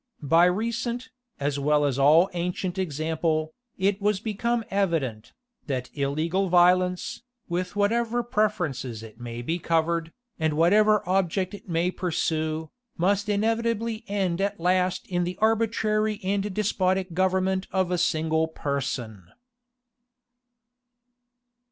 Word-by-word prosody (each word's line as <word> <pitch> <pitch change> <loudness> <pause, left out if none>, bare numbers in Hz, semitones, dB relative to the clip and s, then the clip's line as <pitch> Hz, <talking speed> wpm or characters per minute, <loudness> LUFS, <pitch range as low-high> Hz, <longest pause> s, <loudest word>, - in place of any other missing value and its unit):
By 165 +5 +5
recent, 235 +6 -1 0.3
as 145 0 -1
well 150 +1 +2
as 140 -1 0
all 155 +6 +6
ancient 180 +1 -2
example, 155 -1 -1 0.2
it 195 +1 +1
was 205 -1 +1
become 225 +2 -1
evident, 160 - -1 0.4
that 130 -3 -4
illegal 160 +7 0
violence, 180 +2 +3 0.3
with 180 +2 -3
whatever 235 +3 +1
preferences 175 - -1
it 110 0 -12
may 120 0 -6
be 165 +7 -2
covered, 165 0 0 0.3
and 160 -1 +1
whatever 210 +5 +4
object 185 +1 0
it 205 - -10
may 170 +2 +1
pursue, 160 -3 -2 0.3
must 200 +4 +1
inevitably 225 +1 0
end 195 -3 -1
at 200 -1 -1
last 180 +1 +1
in 175 -1 -1
the 180 +1 -4
arbitrary 215 -1 +1
and 200 +2 -1
despotic 190 -2 0
government 190 +1 +1
of 185 -1 0
a 180 - +1
single 160 -1 +1
person. 130 - -4
180 Hz, 120 wpm, -26 LUFS, 160-205 Hz, 0.4 s, all